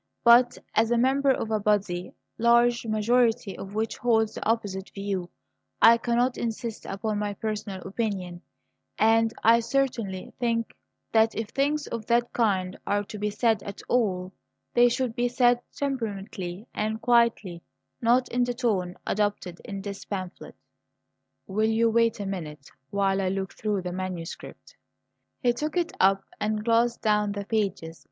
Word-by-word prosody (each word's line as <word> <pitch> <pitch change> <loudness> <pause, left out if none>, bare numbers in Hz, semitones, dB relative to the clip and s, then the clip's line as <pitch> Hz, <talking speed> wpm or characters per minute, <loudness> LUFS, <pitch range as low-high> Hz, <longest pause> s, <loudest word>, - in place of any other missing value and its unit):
But 240 +1 +6 0.2
as 225 +1 +3
a 240 - +2
member 270 +3 +3
of 225 -4 0
a 215 - +1
body 195 -4 0 0.2
the - - -8
large 235 0 +4
majority 225 0 +2
of 195 +1 -8
which 220 +1 -1
holds 225 -2 +2
the - - -6
opposite 200 -4 -1
view, 195 -3 -3 0.5
I 230 +1 +8
cannot 240 +2 +1
insist 230 -1 -4
upon 210 +1 -2
my 205 -1 -2
personal 210 -3 -4
opinion; 190 -5 -3 0.6
and 225 +1 +4
I 230 +1 +6
certainly 230 -7 -2
think 230 -2 -1 0.4
that 220 0 +3
if 225 -1 -3
things 285 +3 0
of 230 -2 -6
that 240 0 +1
kind 190 -5 0
are 205 0 +1
to 210 +1 -9
be 210 +1 0
said 220 -1 +1
at 200 - -8
all, 190 -6 0 0.4
they 245 0 +6
should 240 -1 -1
be 245 0 +1
said 245 0 +3
temperately 205 -7 -4
and 215 +1 -2
quietly; 230 -7 +2 0.4
not 245 +2 +3
in 245 +1 +1
the 245 0 -2
tone 195 -8 -1
adopted 205 -4 -2
in 195 -1 -6
this 200 -1 -6
pamphlet." 185 -3 -6 0.9
"Will 215 +3 0
you 225 +1 +3
wait 230 0 +2
a 200 - -3
minute 155 -7 -6 0.2
while 195 -1 +1
I 185 - 0
look 190 0 -3
through 210 -3 -2
the 180 - -4
manuscript?" 180 -2 -7 0.7
He 245 -1 +4
took 305 +7 -3
it 345 -1 0
up 195 +1 +4 0.2
and 215 0 -1
glanced 235 +1 +2
down 210 -1 +2
the 200 0 -5
pages. 195 -7 -2
220 Hz, 160 wpm, -26 LUFS, 195-235 Hz, 0.9 s, I